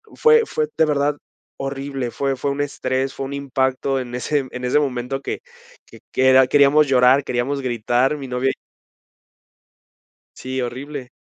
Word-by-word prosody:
fue 460 0 +5
fue, 155 - -1
de 160 - +5
verdad, 145 0 0 0.4
horrible, 135 -2 -4
fue 135 +1 -1
fue 140 +1 -1
un 140 - -2
estrés, 135 -2 -2
fue 135 - -5
un 135 - -6
impacto 135 -1 -1
en 125 -1 -6
ese 135 +2 -1
en 125 - -7
ese 130 +4 +3
momento, 135 -1 -2
que - - -4 0.5
que - - -16
que 130 0 +3
era 130 0 +6
queríamos 145 +2 +5
llorar, 130 +1 +4
queríamos 130 +3 -2
gritar, 125 +3 0
mi 135 - -7
novia 125 +1 0
y - - -1 1.8
Sí, 130 0 -4
horrible. 130 +2 -6
135 Hz, 160 wpm, -21 LUFS, 130-140 Hz, 1.8 s, era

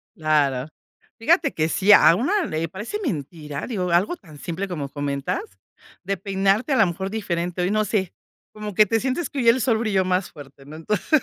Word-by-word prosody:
Claro, 150 -5 +1 0.5
fíjate 310 +4 +2
que 155 0 0
sí, 200 +4 +3
a 165 - +8
una 345 - +1
le 160 - -2
parece 210 - -5
mentira, 150 - -4
digo, 185 -7 -2
algo 180 - +2
tan 160 - -15
simple 180 +6 -4
como 150 -6 -4
comentas, 145 - -3 0.6
de 195 +2 -1
peinarte 195 - 0
a - - +3
la 220 -5 +5
mejor 190 +3 -4
diferente. 180 -4 -2
Ay, 180 - 0
no 215 0 +2
sé 190 -3 -1 0.4
como 210 -2 -7
que 215 - +6
te 225 +3 +1
sientes 265 +8 -2
que 260 -5 0
el 250 +3 +5
sol 230 -2 +2
brilló 210 -4 +1
más 185 +1 0
fuerte, 140 -2 -13
¿no? 150 - -10
Entonces, 210 - 0
190 Hz, 195 wpm, -23 LUFS, 160-220 Hz, 0.6 s, a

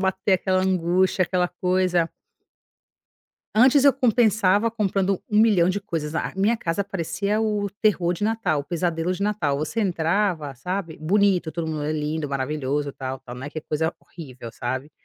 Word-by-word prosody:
bater 190 +1 +1
aquela 185 0 +1
angústia, 185 0 +2
aquela 180 0 0
coisa. 180 -1 +1 1.5
Antes 265 +4 +6
eu 280 - +7
compensava 220 -4 +3
comprando 195 -4 0
um 210 - +3
milhão 205 -6 +4
de 195 +2 -1
coisas, 160 -6 -4
a - - -1
a - - -19
minha 205 +5 +2
casa 170 -1 -1
parecia 200 +3 -2
o 210 -2 -1
terror 185 -5 +2
de 180 - -3
natal, 220 -9 0
o - - -9
pesadelo 170 +2 -1
de 185 - -4
natal. 195 -9 0
Você 155 +10 -2
entrava, 175 -4 0
sabe, 180 +3 -4
bonito, 180 0 +2
tudo 160 -2 -3
é 150 - -1
lindo, 150 0 -2
maravilhoso, 140 +1 -2
tal, 130 -1 -5
tal, 130 -2 -11
não 130 - -7
é - - -7
que 155 - -5
é - - -6
coisa 160 +2 -2
horrível, 130 -8 -10
sabe, 130 +5 -4
180 Hz, 170 wpm, -24 LUFS, 155-200 Hz, 1.5 s, eu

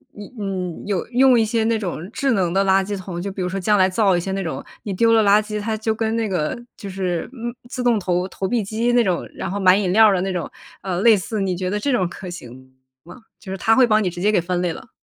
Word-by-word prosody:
一 205 -1 -9
嗯， 185 -4 -4
有 195 -4 -1
用 250 0 +5
一 225 - +3
些 225 +1 0
那 225 0 +2
种 180 -4 -5
智 280 -1 0
能 190 -6 +1
的 195 +2 +2
垃 190 0 +3
圾 205 +1 -4
桶， 180 -2 -6
就 200 +2 -4
比 190 - -6
如 - - -1
说 195 - -3
将 205 +3 +2
来 185 -1 +5
造 190 -1 +2
一 - - +1
些 190 +3 -4
那 195 0 -2
种 165 - -5 0.2
你 200 - -4
丢 230 +4 +3
了 225 - +5
垃 205 +1 +5
圾， 210 0 -5
它 220 +1 -2
就 220 +1 -1
跟 220 0 -1
那 225 -1 0
个 175 -3 -2 0.2
就 200 - -8
是， 185 -3 -3
嗯 240 -2 -5 0.2
自 250 -1 -4
动 235 -3 +3
投 180 0 -1
投 190 0 -4
币 235 +1 0
机 225 +4 -1
那 240 -1 +4
种， 185 -5 -1
然 190 - -4
后 200 - -3
买 185 -1 +5
饮 190 -3 0
料 220 0 +7
的 190 - +1
那 190 0 -2
种， 175 -3 -3 0.3
呃， 185 -2 -3
类 225 +1 +6
似 210 +3 -3
你 190 -2 -1
觉 185 +1 -3
得 205 +2 -1
这 280 +7 -1
种 190 -8 +1
可 185 +2 -9
行 130 -6 -10 0.3
吗？ 175 +2 -12 0.2
就 190 - -9
是 190 - -4
它 225 +4 +3
会 260 - +6
帮 215 -2 +2
你 185 - 0
直 175 0 -8
接 205 +4 +2
给 205 - +2
分 180 +1 -2
类 175 -2 -1
了。 250 - -11
195 Hz, 310 characters per minute, -21 LUFS, 180-220 Hz, 0.3 s, 料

